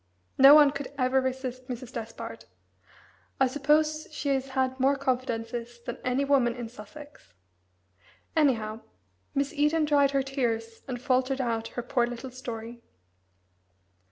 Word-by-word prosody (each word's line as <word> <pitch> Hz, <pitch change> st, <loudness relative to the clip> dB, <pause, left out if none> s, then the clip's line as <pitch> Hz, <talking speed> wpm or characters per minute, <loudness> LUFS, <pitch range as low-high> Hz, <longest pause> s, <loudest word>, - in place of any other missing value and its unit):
No 275 Hz, +2 st, +10 dB
one 295 Hz, -2 st, +7 dB
could 280 Hz, -1 st, -6 dB
ever 260 Hz, 0 st, +2 dB
resist 255 Hz, -1 st, -4 dB
Mrs. 250 Hz, -1 st, -7 dB
Despard 165 Hz, -, -7 dB, 0.9 s
I 265 Hz, -, +5 dB
suppose 305 Hz, +3 st, +1 dB
she 290 Hz, -1 st, -3 dB
has 270 Hz, -1 st, 0 dB
had 260 Hz, 0 st, 0 dB
more 270 Hz, +2 st, +3 dB
confidences 240 Hz, -3 st, -3 dB
than 235 Hz, -, -7 dB
any 255 Hz, +2 st, +1 dB
woman 260 Hz, -4 st, +3 dB
in 240 Hz, -2 st, -6 dB
Sussex. 245 Hz, -, -13 dB, 1.0 s
Anyhow, 230 Hz, -8 st, +1 dB, 0.5 s
Miss 280 Hz, +2 st, 0 dB
Eden 300 Hz, +1 st, +2 dB
dried 285 Hz, -2 st, +4 dB
her 275 Hz, -1 st, +1 dB
tears 230 Hz, -4 st, -2 dB
and 250 Hz, -2 st, -4 dB
faltered 260 Hz, +2 st, +1 dB
out 230 Hz, -3 st, -1 dB
her 245 Hz, -, -1 dB
poor 245 Hz, 0 st, +1 dB
little 245 Hz, +2 st, -7 dB
story. 235 Hz, -2 st, -7 dB
260 Hz, 135 wpm, -28 LUFS, 235-280 Hz, 1.0 s, No